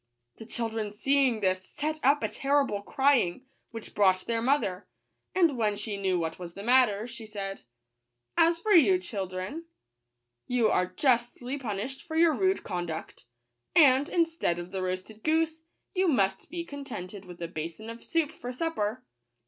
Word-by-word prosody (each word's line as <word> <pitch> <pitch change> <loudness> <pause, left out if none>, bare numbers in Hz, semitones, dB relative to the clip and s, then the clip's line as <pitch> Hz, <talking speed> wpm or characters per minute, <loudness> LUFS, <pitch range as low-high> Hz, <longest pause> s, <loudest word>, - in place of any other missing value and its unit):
The 225 - -10
children 225 -3 -2
see 275 +6 +3
ing 230 -4 -1
this 185 -1 +1
set 305 +9 -4
up 285 +3 +4
a - - +2
terrible 275 -7 +1
crying, 265 -4 +2 0.2
which 225 -2 -9
brought 190 -2 +4
their 230 -1 -1
mother; 230 -8 0 0.5
and 335 -6 +4
when 215 -3 +1
she 205 0 -4
knew 190 -2 0
what 165 0 -3
was 170 -1 -8
the 200 - -7
matter, 240 -3 +4
she 235 -2 -9
said, 195 -2 -5 0.4
" 120 0 -54
As 335 - -1
for 425 +5 -1
you, 255 - +7
children, 185 0 -5
S 330 +2 -6 0.8
you 245 -3 +2
are 180 - +2
justly 245 +5 0
punished 235 +2 -4
for 320 -2 -7
your 330 0 +5
rude 380 +3 +1
con 175 -3 -3
duct; 160 -5 -7 0.5
and, 285 -2 +6
instead 330 - +1
of 175 +1 -7
the 190 -1 -3
roasted 185 +4 -4
goose, 320 0 +1 0.3
you 375 -1 +2
must 200 - +1
be 340 0 -4
contented 205 - -7
with 180 -1 -11
a 170 - -3
basin 165 +6 -6
of 230 +1 -8
soup 325 -3 0
for 245 -5 -7
supper." 250 -5 -2
225 Hz, 175 wpm, -28 LUFS, 190-285 Hz, 0.8 s, you